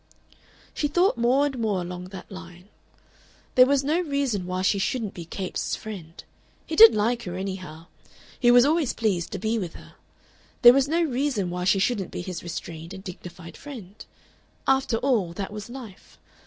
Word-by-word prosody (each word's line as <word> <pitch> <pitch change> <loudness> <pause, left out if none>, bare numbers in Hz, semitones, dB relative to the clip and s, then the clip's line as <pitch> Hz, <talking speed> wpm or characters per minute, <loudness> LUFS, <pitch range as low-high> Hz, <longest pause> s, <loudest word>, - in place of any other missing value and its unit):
She 295 - 0
thought 350 +3 +2
more 245 +4 +3
and 270 -4 -3
more 215 -4 0
along 180 0 -6
that 190 +1 -10
line. 180 0 -11 0.8
There 255 0 +7
was 280 0 +2
no 310 +5 +1
reason 280 - -1
why 185 0 -2
she 200 +1 +2
shouldn't 215 +2 -2
be 170 - -8
Capes' 185 +2 -3
friend. 180 -7 -9 0.4
He 320 - -4
did 225 -4 +9
like 230 +3 +1
her, 175 -1 -5
anyhow; 185 -4 -6 0.5
he 240 - +4
was 245 +1 +7
always 310 -2 +1
pleased 195 -7 -1
to - - -2
be 220 +3 -1
with 175 -5 -5
her. - - -14 0.7
There 240 0 +11
was 275 +1 +3
no 335 +3 +1
reason 255 - -1
why 180 0 -3
she 195 +1 +4
shouldn't 195 -1 0
be - - -5
his 180 -2 -6
restrained 170 +1 -7
and 190 - -10
dignified 175 -2 -10
friend. 220 -9 -10 0.6
After 265 -3 +2
all, 225 -10 0
that 195 +2 -5
was 210 +2 -7
life. 240 -6 -11
210 Hz, 180 wpm, -25 LUFS, 180-260 Hz, 0.8 s, There